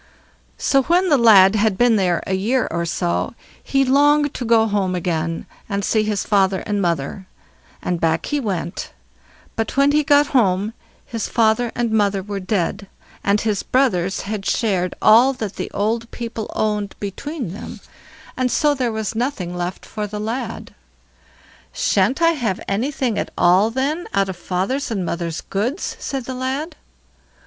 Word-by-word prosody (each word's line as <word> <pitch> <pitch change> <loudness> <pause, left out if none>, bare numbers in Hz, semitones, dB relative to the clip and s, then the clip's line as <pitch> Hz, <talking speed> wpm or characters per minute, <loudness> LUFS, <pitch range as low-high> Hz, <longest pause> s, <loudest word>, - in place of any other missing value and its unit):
So 275 - +3
when 355 +6 +2
the 290 - +5
lad 200 -4 +7
had 215 -2 +1
been 240 -2 +4
there 180 -4 +1
a 190 - -2
year 225 +7 +1
or 170 0 -2
so, 175 +6 -1 0.3
he 270 0 +1
longed 290 +2 +3
to - - -4
go 230 -1 +4
home 200 -4 0
again 165 -2 -2 0.2
and 200 -1 -1
see 220 - +2
his 210 -2 -1
father 195 -2 +2
and 205 -1 -1
mother, 170 +2 -2 0.6
and 175 -2 -2
back 160 0 +1
he 295 - -1
went, 185 -8 -4 0.6
but 225 +3 -3
when 280 +1 +5
he 300 +1 +3
got 290 +1 +5
home 205 -3 +2 0.3
his 230 -3 -4
father 230 +1 +2
and 235 -1 -1
mother 200 -3 +1
were 200 0 -4
dead, 195 +1 -2 0.4
and 200 +1 +2
his 210 -3 0
brothers 195 -9 +1
had 205 -1 -4
shared 190 -5 0
all 240 +5 +6
that 215 -6 -5
the - - -4
old 230 +3 -1
people 230 -2 -6
owned 210 -2 -1
between 225 - -5
them, 205 - -8 0.6
and 255 -1 0
so 295 +3 +3
there 255 -4 -1
was 220 -1 -3
nothing 220 -7 -2
left 175 +1 -4
for 210 -1 -4
the 210 +1 -6
lad. 225 +5 -4 1.0
"Shan't 215 - +1
I 330 - +6
have 235 - -2
anything 240 +2 -1
at - - -3
all, 185 +5 +4
then, 280 +8 -2
out 195 -1 +2
of 190 - -4
father's 190 +12 -2
and 200 -6 -2
mother's 170 -1 -3
goods?" 240 - -3
said 270 -3 -4
the 260 - -5
lad. 265 +6 -3
215 Hz, 165 wpm, -20 LUFS, 190-255 Hz, 1.0 s, lad